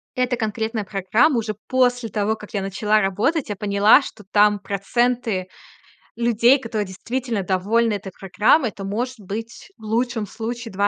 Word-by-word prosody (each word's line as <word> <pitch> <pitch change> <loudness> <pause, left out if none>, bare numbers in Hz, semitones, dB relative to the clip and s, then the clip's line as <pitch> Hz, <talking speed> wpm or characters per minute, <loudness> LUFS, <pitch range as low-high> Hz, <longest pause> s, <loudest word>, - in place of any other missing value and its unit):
эта 250 0 +1
конкретная 220 0 -2
программа 215 - +2
уже 215 -1 -4
после 245 -2 +1
того, 215 +1 0
как 210 - -13
я 200 - -1
начала 210 +2 +1
работать, 215 - 0
я 205 - -2
поняла, 205 +4 +4
что 215 -6 -10
там 210 0 +4
проценты 205 0 -1 0.7
людей, 235 +3 +4
которые 220 -4 -3
действительно 230 +3 -3
довольны 210 +5 +1
этой 195 -2 -6
программой- 215 - +3
это, 195 - -9
может 240 +6 -3
быть, 225 - -7
в - - -21
лучшем 230 0 -1
случае 230 +1 -6
220 Hz, 150 wpm, -22 LUFS, 200-240 Hz, 0.7 s, поняла